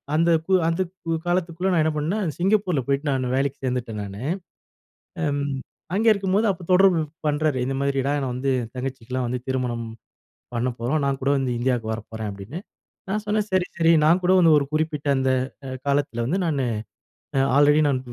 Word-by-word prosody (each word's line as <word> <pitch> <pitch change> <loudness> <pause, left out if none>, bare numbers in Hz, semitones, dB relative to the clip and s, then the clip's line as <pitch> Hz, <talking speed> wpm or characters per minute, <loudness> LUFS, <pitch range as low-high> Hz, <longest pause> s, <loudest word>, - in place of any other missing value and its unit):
அந்த, 165 +2 +3 0.2
கு 190 - 0
அந்த 165 +3 +1 0.5
காலத்துக்குள்ள 175 +1 0
நான் 160 -3 +3
என்ன 160 -1 +1
பண்ணேன், 165 +1 -1
சிங்கப்பூர்ல 185 - +2
போயிட்டு 140 +2 0
நான் 130 -1 -1
வேலைக்கு 140 +1 -1
சேர்ந்துட்டேன் 120 -4 -2
நானு. 100 +4 -7 1.0
அம் 145 -1 0 0.5
அங்கே 220 +2 +4
இருக்கும்போது 200 +2 +1
அப்போ 180 - -11
தொடர்பு 180 -3 +5 0.3
பண்றாரு. 145 -2 +1
இந்த 135 - -2
மாதிரி 140 -1 +1
நான் 140 -3 -1
வந்து 130 +2 -1
என் 115 - -9
தங்கச்சிக்கு 125 -2 -5
எல்லாம் 130 -1 0
வந்து 125 0 -2
திருமணம் 125 -3 -1 0.7
பண்ணப்போறோம். 125 +4 -1
நான் 135 -1 -1
கூட 140 - +2
வந்து 130 -2 -1
இந்தியாவுக்கு 120 -3 0
வரப்போறேன் 110 -1 -6
அப்பிடின்னு. 100 - -7 0.5
நான் 210 +2 -1
சொன்னேன் 210 0 0
"சரி, 185 -1 +2
சரி 165 -1 +4
நான் 170 +4 +5
கூட 180 +1 +3
வந்து 165 -2 +6
ஒரு 140 - 0
குறிப்பிட்ட 155 -2 -1
அந்த 130 0 +1 0.4
அ - - -6 0.2
காலத்தில 140 -5 0
வந்து 180 +8 0
நான் 150 -4 0 0.8
அ - - +4 0.2
ஆல்ரெடி 145 +1 +5
நான் 135 -2 +1
145 Hz, 170 wpm, -24 LUFS, 125-170 Hz, 1.0 s, வந்து